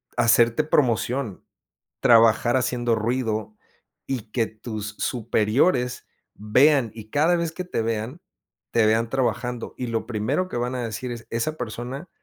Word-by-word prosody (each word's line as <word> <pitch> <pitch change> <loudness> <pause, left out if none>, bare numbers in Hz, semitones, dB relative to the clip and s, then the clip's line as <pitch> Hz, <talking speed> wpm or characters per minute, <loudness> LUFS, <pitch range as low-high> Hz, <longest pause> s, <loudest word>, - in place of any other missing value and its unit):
hacerte 115 +4 +4
promoción, 125 -6 0 0.6
trabajar 115 0 +5
haciendo 120 -2 0
ruido 110 -2 -2 0.5
y 115 -5 -4
que 115 -3 +1
tus 110 -1 -7
superiores 125 +3 +1 0.3
vean 125 +3 +3
y 110 -1 -11
cada 160 +4 +3
vez 170 -1 -1
que 180 +3 -5
te 180 - -2
vean, 115 +8 -3 0.5
te 115 -2 +3
vean 115 +1 +2
trabajando 125 -2 -2
y 125 - -3
lo 115 -1 -2
primero 125 - -1
que - - -4
van 125 +1 -2
a 125 - -2
decir 120 +3 -5
es: 115 -1 -7
"Esa 135 +7 -2
persona 125 +8 -6
120 Hz, 140 wpm, -24 LUFS, 110-130 Hz, 0.6 s, trabajar